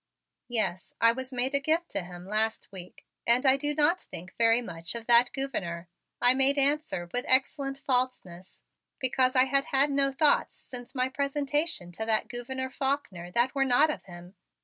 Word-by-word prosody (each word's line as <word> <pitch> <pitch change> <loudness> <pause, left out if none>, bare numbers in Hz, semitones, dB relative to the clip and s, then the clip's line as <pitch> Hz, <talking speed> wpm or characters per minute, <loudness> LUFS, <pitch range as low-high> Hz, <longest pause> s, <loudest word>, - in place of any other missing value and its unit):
"Yes, 215 -8 -1
I 230 - +6
was 260 +2 -6
made 255 +2 -1
a 280 - +2
gift 320 +4 -1
to 200 - -2
him 175 0 -10
last 220 +3 -2
week, 180 -2 -11 0.2
and 240 +3 +4
I 265 0 +5
do 290 +1 -3
not 315 +5 +2
think 175 +2 -11
very 230 0 +4
much 170 -5 -4
of 230 -1 -6
that 240 +1 +5
Gouverneur," 175 -11 -4 0.3
I 245 +1 +5
made 270 +2 +3
answer 280 - +1
with 245 - -1
excellent 275 +1 +1
falseness, 250 -10 -3 0.3
because 255 0 +1
I 255 0 +6
had 275 +1 +1
had 275 +2 +2
no 275 0 +1
thoughts 290 +2 +2
since 250 +1 -9
my 255 0 +1
presentation 280 - -1
to 220 +6 -5
that 220 -1 +1
Gouverneur 260 +2 -5
Faulkner 265 -12 -3
that 240 +7 +1
were 275 -1 +1
not 270 +4 +3
of - - -8
him. 175 0 -12
255 Hz, 180 wpm, -27 LUFS, 220-275 Hz, 0.3 s, I